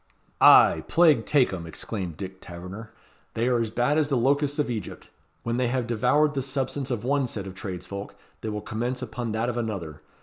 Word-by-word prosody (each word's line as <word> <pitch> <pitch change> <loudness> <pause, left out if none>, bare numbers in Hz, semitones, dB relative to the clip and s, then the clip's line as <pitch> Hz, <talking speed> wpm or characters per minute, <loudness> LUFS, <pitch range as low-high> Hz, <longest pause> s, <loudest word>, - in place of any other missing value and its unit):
"Ay, - - +7
plague 155 -9 +4
take 135 -8 +3
'em!" 85 -3 -5
exclaimed 90 -1 -5
Dick 95 -1 -7
Taverner. 90 +6 -9 0.4
"They 115 +2 +1
are 120 -2 +2
as 115 - -1
bad 120 +7 +1
as 150 -2 +1
the 135 - +2
locusts 140 +3 +1
of 150 - +1
Egypt. 110 -7 -6 0.3
When 115 +1 -1
they 125 -1 +1
have 125 0 -1
devoured 145 +6 +2
the 135 - -1
substance 135 0 -3
of 120 -4 -2
one 135 +1 +1
set 100 -4 -5
of 95 - -7
tradesfolk 95 +1 -7 0.3
they 110 - -3
will 105 0 -4
commence 125 +4 -3
upon 115 -1 -4
that 110 +2 0
of 120 -1 -2
another. 100 -10 -4
120 Hz, 200 wpm, -26 LUFS, 100-130 Hz, 0.4 s, Ay